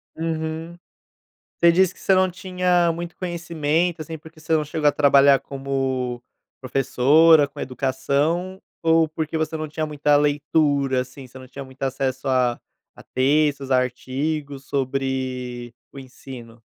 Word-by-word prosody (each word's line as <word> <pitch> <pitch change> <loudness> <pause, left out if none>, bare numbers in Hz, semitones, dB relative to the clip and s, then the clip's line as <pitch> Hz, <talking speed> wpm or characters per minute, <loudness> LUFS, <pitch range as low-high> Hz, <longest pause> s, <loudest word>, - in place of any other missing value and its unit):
Uhum. 160 +1 -4 0.8
Você 170 - +6
disse 180 +1 +3
que - - -20
você 195 - +2
não 185 0 +3
tinha 180 -1 +1
muito 170 +1 -6
conhecimento, 170 -1 -1
assim, 160 +1 -7
porque 160 +1 -16
você 160 +1 -2
não 155 -1 +2
chegou 150 0 -1
a - - 0
trabalhar 140 -1 +5
como 135 -2 -3 0.4
professora, 145 +4 +4
com - - -13
educação, 140 +8 -1 0.2
ou 165 -1 +3
porque 155 +1 -4
você 160 0 -2
não 155 0 -4
tinha 155 +1 -3
muita 150 -1 +1
leitura, 145 -2 +1
assim, 130 +1 -10
você 130 - -14
não 130 0 -12
tinha 140 +2 -8
muito 130 0 -16
acesso 135 0 -2
a 125 -2 +1 0.3
a - - -15
textos, 140 0 +1
artigos 135 +3 -2
sobre 130 -3 -3 0.2
o - - -12
ensino? 125 -3 -12
145 Hz, 145 wpm, -22 LUFS, 130-160 Hz, 0.8 s, Você